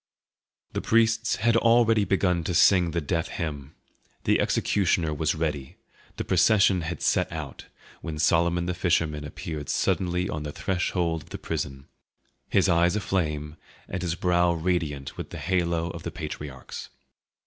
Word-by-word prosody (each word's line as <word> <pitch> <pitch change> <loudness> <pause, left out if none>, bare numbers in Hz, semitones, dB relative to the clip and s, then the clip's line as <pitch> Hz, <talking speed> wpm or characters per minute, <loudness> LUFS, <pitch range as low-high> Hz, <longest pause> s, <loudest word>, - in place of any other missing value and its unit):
The - - -2
priests 115 0 +2
had 115 0 +2
already 115 -2 +4
begun 90 -2 +1
to 90 - -1
sing 90 0 +5
the 85 +1 -1
death 80 +2 -1
hymn; 75 -4 -5 0.5
the - - +3
executioner 85 -5 +1
was 75 +2 0
ready, 75 -4 -3 0.4
the - - -2
procession 95 0 +4
had 85 +2 -5
set - - +2
out, 80 -5 -7 0.3
when 80 -2 -5
Solomon 85 +3 +2
the 90 - -1
fisherman 80 -4 0
appeared 75 -1 -6
suddenly 90 0 0
on 75 -5 -4
the 75 0 -5
threshold 85 -2 -1
of - - -17
the - - -6
prison, 70 0 -4 0.6
his 100 0 +3
eyes 85 +1 +3
aflame 75 -6 -2 0.3
and 95 - -4
his 85 -2 -1
brow 90 -1 +2
radiant 80 -5 -2
with - - -6
the - - -7
halo 85 +1 0
of 85 - -8
the 85 - -4
patriarchs. 75 -4 -7
85 Hz, 150 wpm, -26 LUFS, 75-90 Hz, 0.6 s, sing